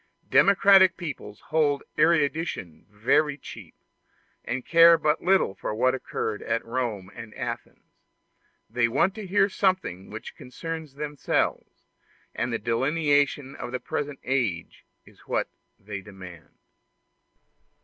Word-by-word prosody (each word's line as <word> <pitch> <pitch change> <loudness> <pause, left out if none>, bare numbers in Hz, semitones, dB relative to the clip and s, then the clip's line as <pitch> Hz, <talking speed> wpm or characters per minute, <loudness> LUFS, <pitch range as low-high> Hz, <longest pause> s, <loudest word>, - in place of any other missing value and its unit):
Democratic 195 -2 +6
peoples 140 - -7
hold 145 -3 +2
erudition 155 - 0
very 135 +8 +1
cheap, - - -11 0.7
and 125 +1 -4
care 170 0 +7
but 150 -1 0
little 190 - +2
for 105 - -5
what 130 +3 +2
occurred 110 -4 -4
at 115 +1 -2
Rome 115 -6 -3
and 110 0 -10
Athens; - - -7 0.7
they 120 -1 +1
want 140 +11 +1
to 215 -2 -8
hear 195 +1 +3
something 185 - -1
which 110 +1 -8
concerns 160 +2 -7
themselves, 150 0 -2 0.5
and 120 - -2
the 115 - 0
delineation 145 +2 +1
of 120 - -7
the 125 - -3
present 145 +1 -4
age 120 -11 -2 0.2
is - - -20
what - - -1 0.3
they 100 -1 -7
demand. 90 -5 -12
135 Hz, 120 wpm, -26 LUFS, 115-165 Hz, 0.7 s, care